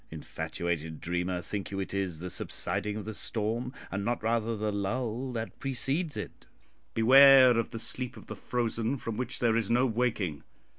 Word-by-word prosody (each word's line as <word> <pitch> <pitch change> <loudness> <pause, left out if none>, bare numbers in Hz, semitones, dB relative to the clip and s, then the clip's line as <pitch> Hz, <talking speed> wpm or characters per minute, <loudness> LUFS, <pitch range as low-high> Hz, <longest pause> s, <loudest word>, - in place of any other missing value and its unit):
Infatuated 80 0 -4
dreamer, 90 +1 -2
think 100 -2 -4
you 100 - -4
it 95 - -4
is 95 -4 -2
the 90 +3 -5
subsiding 105 +3 -1
of 105 - -6
the 110 - -5
storm, 115 +4 -1 0.2
and 100 +1 -2
not 120 +1 -1
rather 115 0 0
the 105 0 -1
lull 115 +5 -2
that 115 -1 -5
precedes 135 +5 -1
it? - - -7 0.5
Beware 130 +2 +8
of 115 - -1
the 115 - -6
sleep 125 +2 -4
of - - -12
the - - -7
frozen, 120 +1 -1
from 115 -2 -5
which 125 +2 -2
there 115 -2 +2
is 115 -3 0
no 120 +2 +3
waking." 110 - -1
110 Hz, 180 wpm, -29 LUFS, 100-125 Hz, 0.5 s, Beware